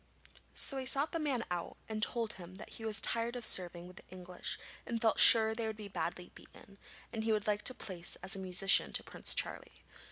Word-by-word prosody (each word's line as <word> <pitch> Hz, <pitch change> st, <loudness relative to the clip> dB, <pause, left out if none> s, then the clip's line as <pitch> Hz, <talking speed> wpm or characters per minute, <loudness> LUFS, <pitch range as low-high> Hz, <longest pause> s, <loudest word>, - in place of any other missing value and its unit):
So 275 Hz, -, +3 dB
he 260 Hz, -1 st, -2 dB
sought 280 Hz, +4 st, +2 dB
the 330 Hz, -, -2 dB
man 275 Hz, -7 st, -1 dB
out, 175 Hz, -1 st, -4 dB
and 215 Hz, -1 st, -4 dB
told 230 Hz, -1 st, -1 dB
him 180 Hz, 0 st, -11 dB
that 190 Hz, -, -9 dB
he 225 Hz, -, -8 dB
was 215 Hz, -1 st, +3 dB
tired 235 Hz, +1 st, -1 dB
of 245 Hz, -2 st, 0 dB
serving 175 Hz, -3 st, +2 dB
with 180 Hz, +1 st, -13 dB
the -, -, -13 dB
English 180 Hz, -1 st, -6 dB, 0.3 s
and 230 Hz, -1 st, -3 dB
felt 220 Hz, -1 st, +2 dB
sure 220 Hz, -1 st, +8 dB
they 225 Hz, 0 st, -3 dB
would 220 Hz, -1 st, -5 dB
be 210 Hz, -1 st, -8 dB
badly 175 Hz, -1 st, -4 dB
beaten, 200 Hz, 0 st, -16 dB, 0.3 s
and 220 Hz, -1 st, -3 dB
he 225 Hz, -, 0 dB
would 215 Hz, -1 st, 0 dB
like 210 Hz, +2 st, +1 dB
a -, -, -8 dB
place 180 Hz, -5 st, -4 dB
as 195 Hz, -, -3 dB
musician 190 Hz, 0 st, +2 dB
to -, -, +1 dB
Prince -, -, 0 dB
Charlie. -, -, -3 dB
215 Hz, 220 wpm, -34 LUFS, 185-230 Hz, 0.3 s, sure